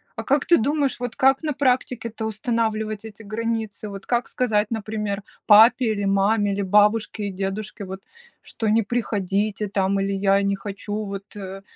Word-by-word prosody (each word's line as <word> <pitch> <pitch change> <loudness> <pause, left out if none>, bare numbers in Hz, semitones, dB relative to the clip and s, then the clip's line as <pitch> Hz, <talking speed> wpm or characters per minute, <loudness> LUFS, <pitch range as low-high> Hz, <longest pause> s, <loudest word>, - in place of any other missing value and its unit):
А - - -5
как 280 0 +1
ты 345 - +5
думаешь, 280 +2 0
вот 245 -2 -4
как 270 0 +3
на 300 - -1
практике-то 250 -4 -1
устанавливать 220 -1 -2
эти 220 0 -10
границы? 220 0 -3
Вот 200 -1 -8
как 240 0 0
сказать, 220 -4 0
например, 210 -2 -3 0.2
папе 225 +2 +7
или 205 -2 -2
маме, 200 +1 +2
или 200 - -2
бабушке 210 +2 +2
и 200 - -4
дедушке 195 +2 -4
вот, 190 +1 -7 0.4
что: 225 - -4
"Не 225 +2 +4
приходите 205 -2 -1
там" 195 0 0
или 195 0 -1
"Я 195 0 +2
не 200 0 +1
хочу", 205 +1 -5
вот, 200 +1 -8
э, 195 -1 -7
210 Hz, 170 wpm, -23 LUFS, 200-230 Hz, 0.4 s, папе